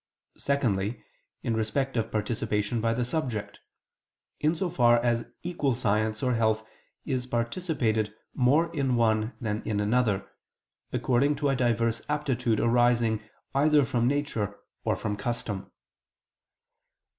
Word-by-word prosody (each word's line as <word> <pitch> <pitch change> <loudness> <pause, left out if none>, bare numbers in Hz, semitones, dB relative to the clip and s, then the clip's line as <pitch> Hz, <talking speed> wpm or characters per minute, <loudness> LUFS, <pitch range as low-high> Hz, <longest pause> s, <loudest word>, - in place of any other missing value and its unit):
Secondly, 115 -6 0 0.4
in 115 - 0
respect 130 +5 -1
of 115 -1 -1
participation 110 +1 -1
by 115 0 +2
the 120 +1 0
subject: 125 -6 -2 0.8
in 155 +2 +2
so 185 +3 -1
far 120 -8 +4
as 120 -1 0 0.2
equal 155 -7 0
science 110 -1 0
or 125 -1 +2
health 110 -1 +1 0.4
is 130 -3 -2
participated 115 - 0 0.2
more 150 +7 +3
in 135 -4 +1
one 110 0 +2
than 110 -2 -2
in 105 -1 -1
another, 105 -1 +1 0.6
according 135 +4 +2
to 145 0 0
a 135 - +2
diverse 115 -2 +1
aptitude 130 -6 0
arising 120 -2 +3 0.3
either 145 +1 +4
from 120 0 +1
nature, 125 -8 -1 0.2
or - - +1
from 105 -1 -3
custom. 105 -2 -3
120 Hz, 125 wpm, -28 LUFS, 110-135 Hz, 0.8 s, far